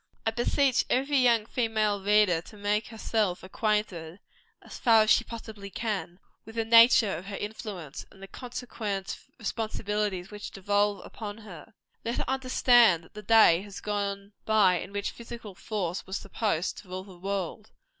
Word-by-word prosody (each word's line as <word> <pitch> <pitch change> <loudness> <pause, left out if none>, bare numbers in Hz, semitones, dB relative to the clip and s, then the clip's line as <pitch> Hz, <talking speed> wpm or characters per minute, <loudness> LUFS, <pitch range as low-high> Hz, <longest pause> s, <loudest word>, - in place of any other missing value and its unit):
I 225 - +2
beseech 255 +3 +2
every 275 +2 +2
young 235 -4 +4
female 215 -4 0
reader 205 -5 +4
to 210 - -15
make 205 +1 0
herself 220 -4 -1
acquainted, 190 -4 -2 0.4
as - - -10
far 225 -2 +6
as 215 - +2
she 240 - +5
possibly 220 -4 -9
can, 195 -4 -3 0.3
with 225 - -12
the 225 -1 0
nature 230 -3 +6
of 175 +4 -8
her 200 - -5
influence, 205 -8 -6
and 195 - -19
the 195 - -9
consequent 220 -4 -5 0.2
responsibilities 210 -4 -3
which 210 0 -7
devolve 205 +1 0
upon 210 -2 -7
her. 210 -2 -12 0.3
Let 235 +1 -2
her - - -2
understand 245 -8 +4
that - - -20
the 210 - -8
day 210 -5 +6
has 200 -1 -9
gone 200 -1 -3
by 200 -5 +4
in 190 - -8
which 205 0 -3
physical 230 -3 -9
force 190 -2 -4
was 190 +1 -3
supposed 200 -4 -2
to 205 - -15
rule 185 +1 -6
the 190 -3 -14
world. 195 +2 -4
210 Hz, 165 wpm, -28 LUFS, 195-225 Hz, 0.4 s, far